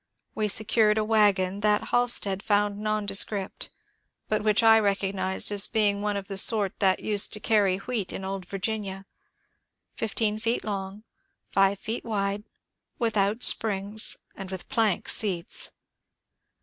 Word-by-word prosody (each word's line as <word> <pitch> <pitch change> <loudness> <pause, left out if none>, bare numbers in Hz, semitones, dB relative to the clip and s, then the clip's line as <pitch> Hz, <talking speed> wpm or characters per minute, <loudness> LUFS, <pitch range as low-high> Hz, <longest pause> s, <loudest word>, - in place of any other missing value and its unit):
We 215 -1 -1
secured 215 +1 +2
a 215 - +1
wagon 200 -3 +2
that 210 0 +1
Halstead 235 -6 0
found 205 -1 +1
nondescript, 205 -2 0 0.6
but 215 - 0
which 215 +1 +2
I 225 0 +7
recognized 195 -2 0
as 205 -1 +2
one 205 -1 +1
of 195 -1 -6
the 195 -1 0
sort 205 -3 +3
that 190 -2 +2
used 205 -1 +2
to 210 - -1
carry 205 -4 +2
wheat 205 -2 -4
in 190 - -6
old 190 -2 -5
Virginia, 195 -1 -4 0.5
— - - -52
fifteen 215 -1 -1
feet 230 +2 -1
long, 200 0 -5 0.5
five 195 0 +2 0.2
wide, 205 -1 -3 0.5
without 220 0 0
springs, 210 0 +2 0.2
and 195 -1 -8
with 190 -1 -7
plank 225 -7 0
seats. 185 -6 0
205 Hz, 135 wpm, -26 LUFS, 195-215 Hz, 0.6 s, I